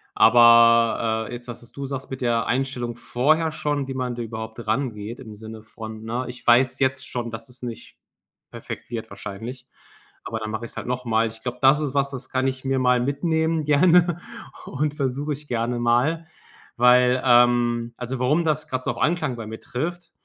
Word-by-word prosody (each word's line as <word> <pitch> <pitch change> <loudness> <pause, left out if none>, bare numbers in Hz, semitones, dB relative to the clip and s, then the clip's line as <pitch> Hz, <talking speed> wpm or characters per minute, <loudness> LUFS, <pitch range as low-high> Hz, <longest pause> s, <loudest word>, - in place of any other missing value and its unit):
aber, 115 -1 +5
äh, - - -7
jetzt, 120 0 -8
das, 120 - -8
was 120 - -15
du 140 -1 -6
sagst, 135 0 -6
mit 130 - -6
der 115 -2 +1
Einstellung 125 -2 -2
vorher 155 +7 +1
schon, 145 -2 -2
wie 135 - -4
man 125 -2 -2
da 120 - -5
überhaupt 110 0 -7
rangeht 115 -1 -2
im 110 -5 -10
Sinne 110 +1 -10
von: 110 0 -9
„Ne, 120 +3 -3
ich 125 -1 -9
weiß 120 +1 +4
jetzt 130 0 0
schon, 120 -1 -4
dass 115 +1 -8
es 125 +1 -10
nicht 120 -3 -8 0.5
perfekt - - -8
wird 115 -2 -5
wahrscheinlich, 115 +6 -8 0.6
aber 110 - -4
dann 110 0 -4
mache 110 +2 -4
ich - - -12
es - - -18
halt - - -5
noch 125 0 -3
mal.” 115 0 +2
Ich 110 0 -12
glaube, 125 +1 -4
das 135 +3 +5
ist 145 -2 -2
was, 140 0 +1
das 130 -1 -8
kann 130 0 0
ich 130 0 -3
mir 135 0 +1
mal 125 -1 +3
mitnehmen 160 +4 0
gerne 170 +3 +4 0.5
und 145 +1 -2
versuche 140 +1 -2
ich 150 +1 -10
gerne 120 +1 -1
mal, 125 +8 +1 0.5
weil 125 +1 +5
ähm, 120 -1 +3
also, 125 +1 -4
warum 140 +7 +2
das 155 -1 0
grad 130 -3 -3
so - - 0
auf - - -5
Anklang 155 -6 0
bei 115 -2 -7
mir 110 +1 -8
trifft, 175 +7 -5
125 Hz, 200 wpm, -23 LUFS, 115-140 Hz, 0.6 s, aber